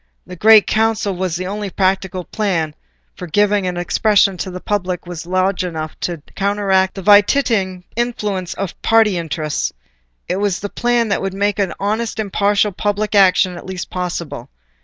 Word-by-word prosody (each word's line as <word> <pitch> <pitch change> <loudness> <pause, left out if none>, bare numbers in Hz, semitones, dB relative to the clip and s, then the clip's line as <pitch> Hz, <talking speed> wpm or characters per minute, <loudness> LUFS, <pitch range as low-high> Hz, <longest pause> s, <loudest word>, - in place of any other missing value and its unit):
The 180 - -9
Great 215 +3 +6
Council 220 -3 +1
was 180 -2 -2
the 180 +1 -3
only 205 +1 -4
practicable 190 0 0
plan 170 -7 -1 0.4
for 180 - -8
giving 205 +2 +2
an 180 -1 -3
expression 200 +2 +2
to 185 - -4
the 180 0 -6
public 185 -3 -2
will 175 0 -7
large 185 +1 0
enough 160 -3 -5
to 170 -4 -4
counteract 195 -1 +1
the 195 - -6
vitiating 205 -3 +3
influence 210 -6 -2
of 195 -2 -5
party 225 -3 +4
interests: 155 -2 -2 0.6
it 180 - -1
was 200 -2 -1
a 205 - -3
plan 240 0 0
that 200 - 0
would 195 0 -3
make 205 +1 0 0.2
honest 220 +3 -2
impartial 205 0 +1
public 205 +2 -2
action 185 -2 +4
at - - -10
least 185 -2 -6
possible. 180 -3 -4
195 Hz, 160 wpm, -18 LUFS, 180-210 Hz, 0.6 s, Great